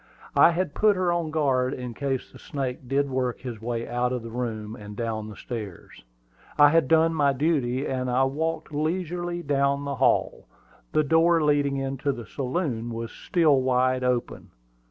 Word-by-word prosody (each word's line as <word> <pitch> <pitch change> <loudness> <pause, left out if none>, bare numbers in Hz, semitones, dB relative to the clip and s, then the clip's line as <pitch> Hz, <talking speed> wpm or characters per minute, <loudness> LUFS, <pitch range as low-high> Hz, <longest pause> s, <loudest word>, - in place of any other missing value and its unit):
I - - +7
had 170 -2 -1
put 210 -1 +3
her 185 -2 +1
on 170 -1 0
her - - -5
guard 135 -4 +1
in 125 -2 -6
case 135 0 -3
the - - -14
snake 130 -2 -5
did 140 +2 +1
work 130 -2 -2
his 120 -4 -7
way 115 0 -3
out 125 +1 0
of 125 -2 -3
the 115 - -8
room 110 -3 -4
and 105 -3 -10
down 110 -1 -3
the 105 - -9
stairs. 105 -7 -8 0.5
I 145 0 +8
had 165 -2 +3
done 165 +1 +4
my 145 -3 +2
duty, 135 -3 0
and 130 -1 -2
I 125 +2 +3
walked 155 +4 -2
leisurely 175 +2 -2
down 140 -1 +1
to - - -6
the 140 0 -2
hall. - - +1 0.4
The 155 - +3
door 165 +2 +3
leading 145 -2 +2
into 135 +1 -1
the 120 -4 -7
saloon 125 - -3
was 115 0 -5
still 155 -7 +2
wide 130 0 +1
open. 125 -1 -2
135 Hz, 185 wpm, -25 LUFS, 125-155 Hz, 0.5 s, I